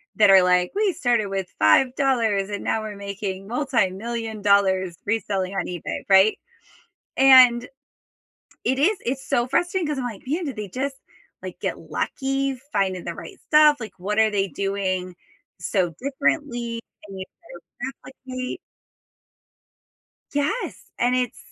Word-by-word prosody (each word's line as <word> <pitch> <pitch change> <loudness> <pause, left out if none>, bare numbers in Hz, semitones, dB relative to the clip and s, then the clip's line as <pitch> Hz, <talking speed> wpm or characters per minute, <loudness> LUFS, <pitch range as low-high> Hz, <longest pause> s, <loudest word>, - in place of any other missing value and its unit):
that 210 -2 +5
are 190 -1 +8
like, 180 0 +3
"We 410 -3 +2
started 240 - +1
with 195 -1 -3
$5 225 - +3
and 205 - -4
now 220 - 0
we're 215 -1 -6
making 200 -1 -5
multi-million 230 -3 -2
dollars 190 -3 +3
reselling 195 -3 -1
on 195 - -1
eBay," 175 -2 -5
right? 195 +2 +6 0.8
And 255 -2 +7 1.0
it 260 +1 +1
is, 380 +10 +3
it's 265 +2 -3
so 240 - +1
frustrating, 350 +5 0
'cause 295 -2 -2
I'm 255 - -3
like, 230 -5 -6
"Man, 320 +7 -1
did 270 -5 -5
they 210 -2 -5
just, 270 +6 -3 0.5
like, - - -8
get - - -2
lucky 270 0 -2 0.2
finding 185 -2 0
the - - -4
right - - -10
stuff?" 300 -1 +6
Like, 215 -4 -7
"What 210 +4 -2
are 220 -1 +4
they 195 -1 0
doing 190 -2 -2 0.5
so 175 0 0
differently," 245 -3 -1 0.3
and 195 -1 -9
you 185 - -5 0.6
try 250 - -2
to - - -15 0.4
replicate. 255 +6 -4 1.7
Yes, 300 +12 -1 0.2
and 245 +1 +2
it's 250 -2 -1
225 Hz, 145 wpm, -23 LUFS, 195-265 Hz, 1.7 s, are